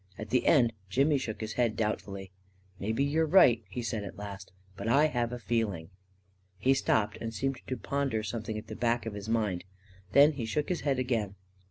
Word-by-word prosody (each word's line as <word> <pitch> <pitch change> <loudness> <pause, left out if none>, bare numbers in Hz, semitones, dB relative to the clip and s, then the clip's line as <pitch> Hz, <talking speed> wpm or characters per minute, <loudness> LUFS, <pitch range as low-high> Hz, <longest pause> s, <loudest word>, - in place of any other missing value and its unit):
At 110 0 -7
the 125 0 +2
end, 120 -7 +5 0.2
Jimmy 140 +7 +3
shook 110 -4 -5
his 110 0 -4
head 120 -3 +1
doubtfully. 100 -3 -3 0.5
"Maybe 110 +7 0
you're 150 +3 +2
right," 130 -10 +6
he 125 - -4
said, 110 -2 -2
at 100 - -8
last; 100 -1 -8 0.2
"but 100 +3 -5
I 140 +6 +5
have 120 -5 0
a 125 - -4
feeling.. 105 -8 -2 0.3
." - - -40 0.3
He 130 +8 +3
stopped 110 -5 +1
and 115 - -3
seemed 130 +4 -2
to 130 - -2
ponder 130 -1 -1
something 110 0 -4
at 110 - -6
the 110 -1 -7
back 115 -1 0
of 110 - -4
his 105 +1 -6
mind. 105 -6 0 0.5
Then 145 +2 +7
he 135 -6 -4
shook 145 +7 -1
his 180 - -1
head 140 -3 +1
again. 115 -6 -1
115 Hz, 205 wpm, -30 LUFS, 105-130 Hz, 0.5 s, Then